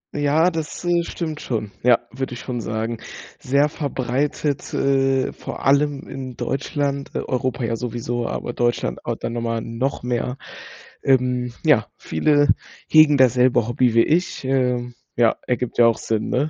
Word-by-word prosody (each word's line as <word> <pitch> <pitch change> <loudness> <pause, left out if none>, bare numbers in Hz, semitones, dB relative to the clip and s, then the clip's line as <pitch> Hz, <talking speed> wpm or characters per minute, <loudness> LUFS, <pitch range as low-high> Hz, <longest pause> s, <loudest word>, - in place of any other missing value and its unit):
Ja, 150 +4 +3
das, 160 +1 -5
äh, 175 0 +3
stimmt 160 -2 -5
schon, 110 -4 -3
ja, 120 -1 +5
würde 130 0 -4
ich - - -8
schon 120 -2 -4
sagen. 110 +1 -3 0.4
Sehr 140 +3 +2
verbreitet, 140 0 -2
äh, 135 -1 +1
vor - - -7
allem 140 0 +2
in 130 -2 -7
Deutschland. 140 0 -2
E - - 0
Europa 130 0 -1
ja 115 0 0
sowieso, 120 0 -3
aber 120 - -4
Deutschland 120 0 0
aber - - -1
dann - - -5
nochmal 115 -1 -2
noch 120 +5 -3
mehr. 125 +1 -2 0.7
Ähm, 125 -2 +1
ja, - - +4
viele 145 - +2 0.4
hegen 155 -2 +6
dasselbe 125 -2 +4
Hobby 120 -1 +2
wie 115 - +6
ich. 170 0 0
Ähm, 125 -2 0 0.2
ja, 115 -2 +3
ergibt 125 -1 -2
ja 120 - +8
auch 115 - +2
Sinn, 110 -1 -2
ne? 140 +5 +1
130 Hz, 155 wpm, -22 LUFS, 120-140 Hz, 0.7 s, ja